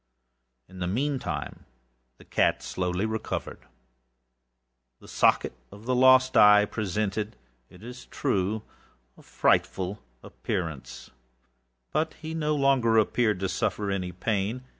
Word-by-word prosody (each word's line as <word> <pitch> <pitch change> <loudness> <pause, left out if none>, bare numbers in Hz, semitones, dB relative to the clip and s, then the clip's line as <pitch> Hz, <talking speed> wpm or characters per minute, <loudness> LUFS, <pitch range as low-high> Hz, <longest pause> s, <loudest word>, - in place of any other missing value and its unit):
In 95 0 -13
the 90 - -2
meantime 135 +7 -3 0.5
the - - -17
cat - - +1
slowly 90 +2 -2
recovered. 110 0 -5 1.3
The - - -16
socket - - +2 0.2
of 105 +2 -13
the 130 - 0
lost 130 0 +5
eye 105 0 +7
presented, 105 +1 -3 0.3
it 90 +3 -16
is 125 +1 -10
true, 105 -4 -1 0.5
a - - -18
frightful 95 +2 0 0.2
appearance, 80 -7 -5 0.8
but 155 +2 -1
he 160 0 -7
no 150 -2 0
longer 135 -5 +3
appeared 110 -2 +2
to 95 - 0
suffer 105 0 -2
any 90 -2 -2
pain. 105 +6 -2
110 Hz, 120 wpm, -27 LUFS, 95-130 Hz, 1.3 s, eye